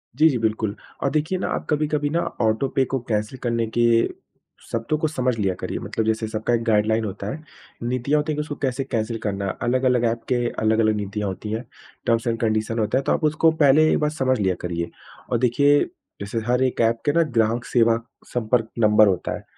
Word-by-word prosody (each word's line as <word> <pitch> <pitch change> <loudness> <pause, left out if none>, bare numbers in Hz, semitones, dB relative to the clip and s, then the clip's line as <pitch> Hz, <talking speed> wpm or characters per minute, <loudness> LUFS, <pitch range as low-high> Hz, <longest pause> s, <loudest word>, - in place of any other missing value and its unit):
जी, 155 +4 +5
जी, 135 - 0
बिल्कुल। 110 -2 -1 0.3
और 140 - +2
देखिए 155 +4 0
ना, - - -2
आप - - -2
कभी-कभी 150 -1 0
ना, 165 +3 0 0.2
ऑटो 110 +4 +2
पे 135 - +4
को 135 +1 -2
कैंसल 105 +3 -1
करने 115 -1 0
के 120 - +4 0.9
शब्दों 115 +6 -1
को 155 - 0
समझ 130 -5 -1
लिया 100 -3 +1
करिए। - - -4
मतलब 110 - -3
जैसे 110 0 0
सबका 110 +2 -1
एक 115 -1 +1
गाइड्लाइन 110 0 +2
होता 100 0 -5
है। 155 +5 -7 0.4
नीतियाँ 125 +5 +1
होती 150 +1 -1
हैं - - -1
कि - - 0
उसको 150 -1 -5
कैसे 135 -1 -1
कैंसल 115 -3 -2
करना 100 -2 -2
है। 95 - -2
अलग-अलग 125 0 +2
एप 115 0 -4
के 125 - +1 0.2
अलग-अलग 110 0 +2
नीतियाँ 105 0 -3
होती 100 +3 -5
हैं। 110 +2 -2 0.4
टर्म्स 115 0 +1
एण्ड 115 -1 0
कन्डिशन 110 0 0
होता 110 +4 +1
है, 135 - 0
तो - - 0
आप - - 0
उसको 155 +1 +3
पहले 150 +3 +6
एक - - +2
बार 150 - +1
समझ 130 -5 0
लिया 95 -3 +1
करिए 85 -1 -3 0.4
और 120 - +3
देखिए, 140 +4 +4 0.4
जैसे 100 +3 -3
हर 125 +1 +2
एक 130 -2 0
एप 115 0 +2
के 145 - +3
ना, 170 - +4
ग्राहक 120 -4 0
सेवा 115 -1 +3 0.4
संपर्क 115 -1 +1
नंबर 105 -1 +6
होता 90 -2 0
है। - - -9
115 Hz, 220 wpm, -23 LUFS, 110-135 Hz, 0.9 s, पहले